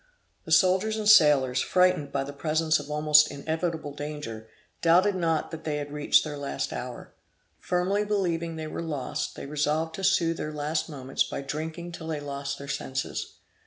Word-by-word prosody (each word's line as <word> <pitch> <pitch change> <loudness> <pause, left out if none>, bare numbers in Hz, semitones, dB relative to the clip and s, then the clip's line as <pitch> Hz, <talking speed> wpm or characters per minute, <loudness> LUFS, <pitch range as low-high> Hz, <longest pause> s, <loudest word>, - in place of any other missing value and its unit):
The - - -8
soldiers 190 +4 +4
and 215 -1 -2
sailors, 145 -10 +6
frightened 180 -6 +2
by 140 0 -1
the 140 +1 -7
presence 155 +1 +1
of 145 0 -9
almost 150 0 +5
inevitable 160 0 -3
danger, 145 -7 -6 0.3
doubted 180 +5 +4
not 165 -4 0
that 160 -1 -7
they 150 -2 -2
had 145 0 -5
reached 150 0 +3
their 150 -2 -6
last 140 - -3
hour. - - -7 0.5
Firmly 185 +3 0
believing 170 -5 -1
they 160 0 -5
were 155 - -5
lost, 150 -6 -3
they - - -7
resolved 150 +3 -1
to 195 - -6
soothe 170 -3 +2
their 155 - -4
last 155 +2 -2
moments 135 -3 -1
by - - -5
drinking 160 +4 -5
till 165 -1 -8
they 155 -2 -2
lost 140 -1 -4
their 140 - -9
senses. 135 -1 -4
155 Hz, 175 wpm, -27 LUFS, 145-170 Hz, 0.5 s, sailors